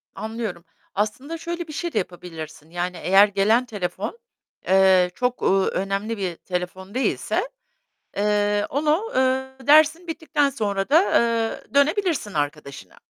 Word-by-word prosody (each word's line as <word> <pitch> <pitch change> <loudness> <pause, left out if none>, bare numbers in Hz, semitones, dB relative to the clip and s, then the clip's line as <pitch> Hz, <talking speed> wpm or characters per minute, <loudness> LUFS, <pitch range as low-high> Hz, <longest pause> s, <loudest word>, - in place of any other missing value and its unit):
Anlıyorum. 220 -6 -5 0.3
Aslında 255 +11 -2
şöyle 340 0 -5
bir 305 - -8
şey 345 +2 -4
de - - -2
yapabilirsin, 165 -4 -6
yani 175 +1 -3
eğer 195 +4 +5
gelen 210 +5 +2
telefon, 205 - -4 0.5
eee, 190 -1 +5
çok, 250 0 -1
uuu, 195 0 +3
önemli 195 +4 -2
bir 185 -4 -3
telefon 185 +2 -5
değilse, 270 - -1 0.7
eee, 205 0 +1
onu, 310 - 0
eee, 265 0 0
dersin 310 +3 +5
bittikten 310 -3 0
sonra 200 -4 -2
da, 320 +5 +6
eee, 230 - 0
dönebilirsin 300 - +1
arkadaşına. 145 - -4
210 Hz, 130 wpm, -23 LUFS, 190-280 Hz, 0.7 s, da